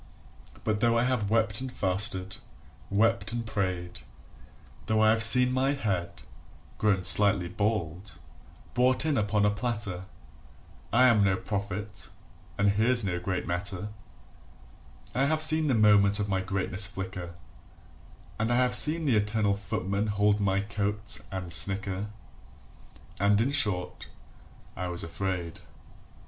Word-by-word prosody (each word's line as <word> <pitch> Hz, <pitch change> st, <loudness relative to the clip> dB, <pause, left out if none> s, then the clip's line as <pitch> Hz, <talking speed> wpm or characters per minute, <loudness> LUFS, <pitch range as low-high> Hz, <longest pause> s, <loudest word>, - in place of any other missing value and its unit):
But 105 Hz, -1 st, -1 dB
though 115 Hz, +1 st, +2 dB
I 115 Hz, -, +2 dB
have 125 Hz, -5 st, -1 dB
wept 110 Hz, 0 st, 0 dB
and 130 Hz, -1 st, -6 dB
fasted, 95 Hz, -2 st, 0 dB, 0.5 s
wept 105 Hz, +1 st, 0 dB
and 120 Hz, 0 st, -4 dB
prayed, 90 Hz, -5 st, -4 dB, 0.9 s
Though 110 Hz, 0 st, +1 dB
I 110 Hz, 0 st, +4 dB
have 110 Hz, 0 st, 0 dB
seen 125 Hz, +3 st, +9 dB
my 130 Hz, +2 st, 0 dB
head 100 Hz, -10 st, -4 dB, 0.6 s
[grown 100 Hz, -3 st, +1 dB
slightly 100 Hz, 0 st, +4 dB
bald] 100 Hz, -2 st, -3 dB, 0.6 s
brought 130 Hz, +3 st, +1 dB
in 155 Hz, -2 st, 0 dB
upon 105 Hz, -2 st, 0 dB
a 105 Hz, -, +2 dB
platter, 105 Hz, -5 st, -4 dB, 0.9 s
I 125 Hz, -, +3 dB
am 110 Hz, -4 st, +3 dB
no 95 Hz, -1 st, +2 dB
prophet 100 Hz, +1 st, -6 dB, 0.5 s
and 100 Hz, +1 st, +2 dB
here's 115 Hz, +2 st, +1 dB
no 90 Hz, -2 st, -2 dB
great 90 Hz, +1 st, -4 dB
matter; 95 Hz, +3 st, -3 dB, 1.2 s
I 135 Hz, -, +1 dB
have 155 Hz, +2 st, 0 dB
seen 155 Hz, 0 st, +3 dB
the 130 Hz, -, +1 dB
moment 105 Hz, -1 st, +4 dB
of 105 Hz, -, -2 dB
my 95 Hz, -1 st, -1 dB
greatness 95 Hz, +1 st, 0 dB
flicker, 95 Hz, -3 st, -7 dB, 1.0 s
And 110 Hz, +2 st, -1 dB
I -, -, +2 dB
have 125 Hz, 0 st, +1 dB
seen 160 Hz, +1 st, +4 dB
the 130 Hz, -6 st, +2 dB
eternal 105 Hz, 0 st, 0 dB
Footman 100 Hz, +1 st, -3 dB
hold 105 Hz, 0 st, +1 dB
my 100 Hz, -1 st, 0 dB
coat, 105 Hz, +1 st, -4 dB
and 90 Hz, -3 st, -5 dB
snicker, 95 Hz, +3 st, +1 dB, 1.1 s
And 100 Hz, +1 st, +2 dB
in 120 Hz, +5 st, 0 dB
short, 105 Hz, -11 st, -2 dB, 0.7 s
I 90 Hz, -, -5 dB
was 90 Hz, -1 st, -5 dB
afraid. 85 Hz, 0 st, -5 dB
105 Hz, 135 wpm, -27 LUFS, 95-115 Hz, 1.2 s, seen